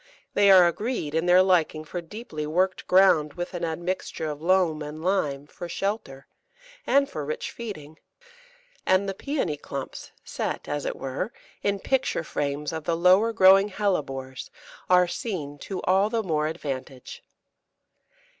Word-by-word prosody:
They 200 -1 +4
are 185 -2 +8
agreed 190 - -2
in 165 +2 0
their 180 +1 +7
liking 165 -4 +2
for 175 +3 -5
deeply 165 -4 -7
worked 185 +4 0
ground 175 -6 +4
with 175 +1 -5
an 175 -1 -4
admixture 170 0 -3
of 150 -1 -5
loam 170 -3 +2
and 150 +2 -7
lime, 145 -7 0
for 170 +3 -9
shelter, 175 -7 -3 0.6
and 280 0 +4
for 150 - -5
rich 150 +2 -4
feeding; 160 -10 -8 0.8
and 185 +1 +2
the 195 - -2
Pæony 195 - -3
clumps, 140 -1 -7
set, - - -4
as 145 0 -3
it - - -2
were, 135 - -4 0.3
in 200 0 0
picture 265 -7 0
frames 145 0 -3
of 160 -2 -5
the 165 -1 0
lower 185 +6 +5
growing 195 -1 +6
Hellebores, 135 -10 -2 0.4
are 180 -1 +5
seen 165 -7 -5
to 190 +3 -6
all 195 +3 +3
the 225 -1 -1
more 155 -4 0
advantage. 135 -5 -6
175 Hz, 150 wpm, -26 LUFS, 150-195 Hz, 0.8 s, are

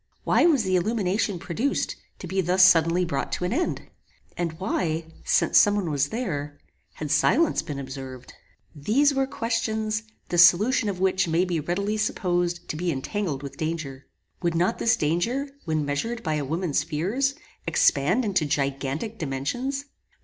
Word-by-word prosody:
Why - - +4
was 285 -9 +3
the 185 -1 +1
illumination 200 0 0
produced, 220 +11 -2 0.2
to - - -8
be 190 +2 0
thus 185 +1 +5
suddenly 170 0 +4
brought 140 -5 -3
to 180 - -1
an 180 - -1
end? 345 +7 -1 0.5
And 170 -2 -2
why, 160 -2 -2 0.2
since - - +4
some 205 0 +4
one 185 -6 -1
was 145 0 +1
there, 150 - -4 0.4
had 150 -2 -5
silence 250 - +3
been 150 -4 -6
observed? 130 -2 -8 0.4
These 240 - +2
were 270 -1 +1
questions, 220 -3 -1 0.3
the 175 - +1
solution 205 +6 +5
of 185 -3 -4
which 190 -1 +2
may 165 +3 +2
be 175 -3 -1
readily 200 +7 -1
supposed 175 -4 -1
to - - -3
be 175 +2 -1
entangled 145 0 -3
with 140 - -8
danger. 155 -5 -4 0.3
Would 170 -2 0
not 175 +3 +1
this 225 - +3
danger, 200 - 0 0.2
when 155 -2 0
measured 225 +12 -3
by 155 - -1
a 150 -2 -1
woman's 160 0 0
fears, 195 - -1 0.3
expand 185 - +3
into 190 -6 +1
gigantic 140 +9 -2
dimensions? 245 - -3
175 Hz, 160 wpm, -25 LUFS, 150-215 Hz, 0.5 s, thus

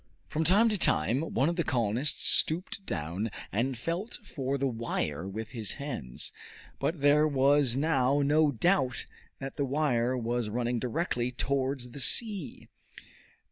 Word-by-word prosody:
From 155 - -1
time 195 +8 +5
to 210 -3 -1
time 110 - +2
one 145 -4 0
of 170 +1 -1
the 170 - +1
colonists 120 +3 0
stooped 180 +4 +2
down 85 +6 -3 0.2
and 125 +5 -1
felt 170 - -4
for 135 -6 -3
the 135 - -1
wire 115 - -2
with 110 +3 -6
his 110 -4 -3
hands; 140 - -5 0.5
but 160 -3 -2
there 150 +2 +5
was 140 -2 +3
now 140 -2 +2
no 150 +2 +4
doubt 130 - +1 0.3
that 135 0 -7
the 140 - 0
wire 130 -3 +1
was 120 -1 -2
running 120 +2 -1
directly 125 -1 -1
towards 130 0 -2
the 140 - -8
sea. 200 - +1
135 Hz, 145 wpm, -29 LUFS, 120-150 Hz, 0.5 s, time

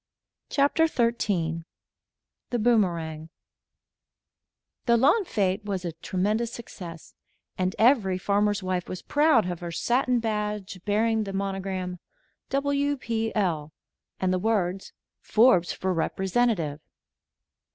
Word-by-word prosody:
CHAPTER 290 +3 +3
XIII 200 - 0 0.9
THE 245 - 0
BOOMERANG 170 -9 +1 1.6
The 235 0 +5
lawn 305 - +4
fête 200 - 0
was 195 -3 -3
a 170 - -2
tremendous 205 +8 -1
success, 175 -8 -9 0.4
and 185 0 -1
every 220 -6 +4
farmer's 205 +1 +1
wife 185 -1 -2
was 185 - -6
proud 295 - +3
of 175 - -5
her 175 -1 -5
satin 245 +6 +1
badge 210 -3 -3
bearing 220 +1 +1
the 195 - -5
monogram: 190 -2 -3 0.5
"W. 285 +1 0
P. 225 -2 -2
L.," 160 -7 0 0.5
and 185 -1 +1
the 185 - +1
words: 195 -3 -1 0.3
"FORBES 215 -7 +4
FOR 185 0 -1
REPRESENTATIVE." 185 -3 0
200 Hz, 110 wpm, -26 LUFS, 180-235 Hz, 1.6 s, The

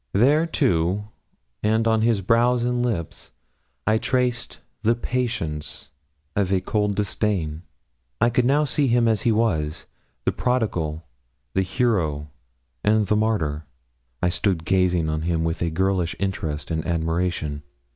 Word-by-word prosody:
There, 145 +10 +4
too, 105 - +1 0.5
and 110 +2 +2
on 110 -1 +3
his 115 -3 +2
brows 120 +4 +3
and 120 0 0
lip, 95 -10 -1 0.7
I 110 +1 +3
traced 125 -1 -1 0.2
the 115 +1 +3
patience 115 -12 -3 0.4
of 100 -2 +1
a 95 - +3
cold 105 +2 0
disdain. 95 -6 -1 0.6
I 120 - +3
could 120 +1 +2
now 145 +4 +3
see 145 0 +1
him 120 -1 +3
as 110 -2 +2
he 115 - +2
was 80 -9 0 0.4
the - - +3
prodigal, 85 -11 -1 0.5
the - - +2
hero, 90 - 0 0.5
and 105 0 +3
the 105 - +1
martyr. 80 -9 0 0.6
I 90 - +4
stood 85 -1 0
gazing 90 -3 +2
on 80 0 -1
him 80 0 0
with 80 0 -2
a 85 - +1
girlish 90 0 0
interest 80 -6 -3
and 80 -1 -1
admiration. 80 -2 -1
100 Hz, 140 wpm, -23 LUFS, 80-115 Hz, 0.7 s, There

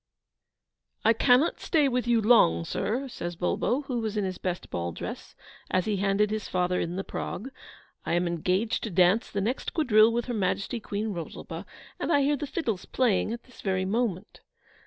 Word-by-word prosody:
'I 225 - +6
cannot 250 +7 +3
stay 305 -4 +2
with 250 -2 -1
you 235 -1 +3
long, 85 - +5
sir,' 230 - -2
says 175 -8 -5
Bulbo, 210 - 0
who 255 -3 -2
was 220 -1 -3
in 205 - +1
his 185 -1 -3
best 180 -1 -4
ball 85 0 -2
dress, - - -7 0.3
as 185 -1 +1
he 210 -2 0
handed 200 +2 +2
his 215 -1 -3
father 180 0 +1
in 170 +1 -2
the 195 - -2
prog, 245 +7 -5 0.5
'I - - -2
am 175 +1 +2
engaged 180 +6 0
to 225 - -3
dance 185 +5 +3
the 200 - -2
next 235 +7 -2
quadrille 225 -8 +5
with 235 +1 -1
Her 245 - -3
Majesty 210 +3 -1
Queen 210 0 -3
Rosalba, 170 -5 -6 0.3
and - - -1
I 285 - +4
hear 290 +2 +2
the 290 +1 -4
fiddles 235 - -2
playing 230 -5 +1
at 235 +1 -5
this 255 - -16
very 190 -1 0
moment. 210 -2 -2
215 Hz, 190 wpm, -27 LUFS, 185-240 Hz, 0.5 s, I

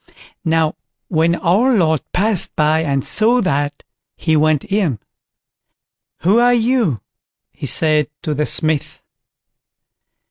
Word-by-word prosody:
_ - - -26 0.3
Now 160 -2 0 0.3
when 165 0 +2
our 215 +9 +2
Lord 160 -6 +2
passed 200 0 0
by 155 +1 +2
and 140 -4 -1
saw 230 +3 +3
that, 145 -6 -2 0.3
he 160 -2 0
went 155 -1 +2
in. 195 - 0 1.2
"Who 200 +7 +3
are 245 0 +4
you?" 230 - 0 0.5
he - - -7
said 155 -2 +1
to 155 -4 -2
the 150 +1 -1
Smith. 155 0 -2
160 Hz, 120 wpm, -17 LUFS, 150-205 Hz, 1.2 s, are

